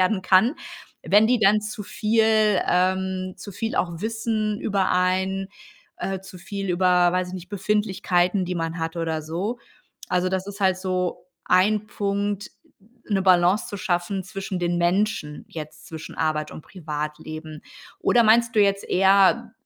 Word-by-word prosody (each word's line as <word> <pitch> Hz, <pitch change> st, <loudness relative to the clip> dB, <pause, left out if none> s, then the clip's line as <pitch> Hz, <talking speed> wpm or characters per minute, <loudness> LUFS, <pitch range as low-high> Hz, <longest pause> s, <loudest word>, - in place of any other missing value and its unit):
werden 185 Hz, +1 st, +2 dB
kann. 190 Hz, +8 st, +4 dB, 0.5 s
Wenn 210 Hz, +2 st, +5 dB
die 245 Hz, +1 st, +3 dB
dann 210 Hz, 0 st, +4 dB
zu 215 Hz, 0 st, -6 dB
viel 215 Hz, 0 st, +2 dB
ähm, 185 Hz, +1 st, 0 dB
zu 195 Hz, +2 st, -9 dB
viel 225 Hz, +4 st, -3 dB
auch 170 Hz, -2 st, -1 dB
Wissen 220 Hz, -1 st, -2 dB
über 195 Hz, -2 st, 0 dB
einen, 190 Hz, +1 st, 0 dB, 0.5 s
äh, 190 Hz, -1 st, -3 dB
zu 190 Hz, -1 st, -12 dB
viel 195 Hz, +1 st, -5 dB
über 180 Hz, -1 st, +3 dB
weiß 180 Hz, 0 st, 0 dB
ich 185 Hz, -, -7 dB
nicht, 180 Hz, -1 st, -8 dB
Befindlichkeiten, 190 Hz, -2 st, 0 dB
die 180 Hz, +1 st, -3 dB
man 165 Hz, 0 st, -3 dB
hat 165 Hz, +1 st, -3 dB
oder 160 Hz, -2 st, -2 dB
so. 180 Hz, +10 st, -4 dB, 0.5 s
Also 180 Hz, 0 st, +1 dB
das 190 Hz, 0 st, -2 dB
ist 200 Hz, 0 st, -8 dB
halt 190 Hz, -1 st, +3 dB
so 185 Hz, -2 st, -2 dB, 0.2 s
ein 205 Hz, +3 st, +3 dB
Punkt, 205 Hz, 0 st, -2 dB, 0.6 s
'ne 195 Hz, -3 st, +1 dB
Balance 185 Hz, +1 st, +3 dB
zu 205 Hz, -, -5 dB
schaffen 185 Hz, 0 st, -2 dB
zwischen 195 Hz, -2 st, -5 dB
den 175 Hz, 0 st, 0 dB
Menschen 175 Hz, -3 st, 0 dB
jetzt, 155 Hz, -1 st, -9 dB
zwischen 160 Hz, -1 st, -9 dB
Arbeit 155 Hz, -1 st, -1 dB
und -, -, -10 dB
Privatleben. 155 Hz, -1 st, -6 dB, 0.4 s
Oder 240 Hz, -, +4 dB
meinst 230 Hz, +1 st, +4 dB
du -, -, +6 dB
jetzt 200 Hz, -1 st, +2 dB
eher, 195 Hz, +5 st, +4 dB
190 Hz, 155 wpm, -24 LUFS, 175-205 Hz, 0.6 s, du